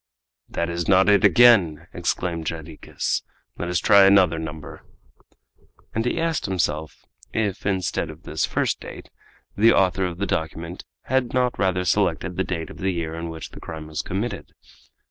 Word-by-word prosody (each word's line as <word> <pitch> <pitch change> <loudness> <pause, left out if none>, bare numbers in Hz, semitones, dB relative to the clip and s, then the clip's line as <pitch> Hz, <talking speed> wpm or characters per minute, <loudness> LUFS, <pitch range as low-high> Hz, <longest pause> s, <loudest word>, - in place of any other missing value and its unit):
"That 85 - -2
is 85 0 -3
not 95 +1 +5
it 100 0 +4
again!" 95 -7 +5
exclaimed 85 -2 -2
Jarriquez. 80 -1 -3 0.4
"Let 85 - -3
us 90 - +1
try 100 +4 +6
another 95 -4 +5
number." 80 -1 -7 1.1
And 115 - 0
he - - 0
asked 165 -6 -1
himself, 80 -4 -2 0.3
if 105 -3 -1
instead 95 -3 -1
of - - -11
this - - -3
first - - 0
date - - -10 0.4
the 115 +3 +5
author 95 0 +2
of 85 -1 -6
the 100 - -1
document 80 0 -4 0.2
had 130 -1 0
not 125 -1 +1
rather 90 -1 +1
selected 90 -2 0
the 95 - 0
date 85 -3 -4
of - - -12
the 95 - 0
year 85 -3 -3
in 85 0 -5
which 80 -1 -7
the - - -11
crime 80 -1 -8
was 75 -1 -4
committed. 100 +6 -4
90 Hz, 165 wpm, -23 LUFS, 80-100 Hz, 1.1 s, try